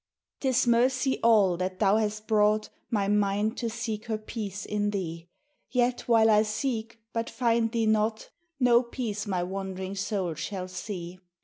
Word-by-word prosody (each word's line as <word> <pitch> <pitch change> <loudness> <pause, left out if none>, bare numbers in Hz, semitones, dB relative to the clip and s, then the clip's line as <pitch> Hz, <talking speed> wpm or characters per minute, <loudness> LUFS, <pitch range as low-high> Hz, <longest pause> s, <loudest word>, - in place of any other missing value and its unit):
>T 270 - -2
is 260 -1 +3
mercy 255 +3 +2
all 205 -6 +4
that 185 +1 -3
thou 200 +1 +4
hast 215 0 -2
brought 215 0 +2 0.2
My 205 -4 0
mind 205 +2 +1
to 235 - -2
seek 220 -1 -4
her 220 -2 -1
peace 210 -2 -6
in 205 0 -1
thee. 170 -4 -4 0.4
Yet 245 -1 0
while 225 -2 +5
I 210 0 +6
seek 225 +1 -2 0.2
but 230 0 -2
find 230 -2 +1
thee 230 -1 +1
not 220 0 +1 0.3
No 245 -2 +5
peace 230 -4 -4
my 185 -3 0
wand'ring 190 0 -4
soul 195 -3 -2
shall 185 +4 -5
see. 185 -1 -6
215 Hz, 165 wpm, -28 LUFS, 195-230 Hz, 0.4 s, I